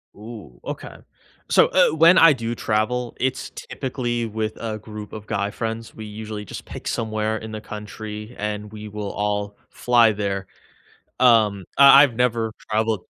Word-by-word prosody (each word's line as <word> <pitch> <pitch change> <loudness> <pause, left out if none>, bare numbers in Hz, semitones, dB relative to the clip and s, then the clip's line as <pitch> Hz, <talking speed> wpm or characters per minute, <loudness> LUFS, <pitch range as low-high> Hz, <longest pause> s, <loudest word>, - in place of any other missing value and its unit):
Ooh, 105 - -11
okay, - - -7 0.5
so, - - +5
eh, 185 - +5
when 165 +4 +6
I 165 -4 +8
do 115 -3 -3
travel, 120 +2 -1
it's 130 0 -1
typically 120 -3 -4
with 110 0 -3
a 110 -2 -3
group 105 0 -9
of 110 -1 -8
guy 100 -1 -2
friends. 115 +1 -5
We 110 - -8
usually 105 0 -7
just - - -8
pick - - -8
somewhere 110 -1 -1
in 110 0 -8
the 110 - -5
country, 105 +1 -8
and 105 0 -4
we 105 0 -8
will 105 -1 -5
all 105 0 -2
fly 120 -2 +4
there. 100 -2 -3 0.7
Um, 110 -6 +4
I 140 0 +9
I've 140 -5 +2
never 115 -2 +1 0.2
traveled 110 -2 0
110 Hz, 160 wpm, -22 LUFS, 105-120 Hz, 0.7 s, I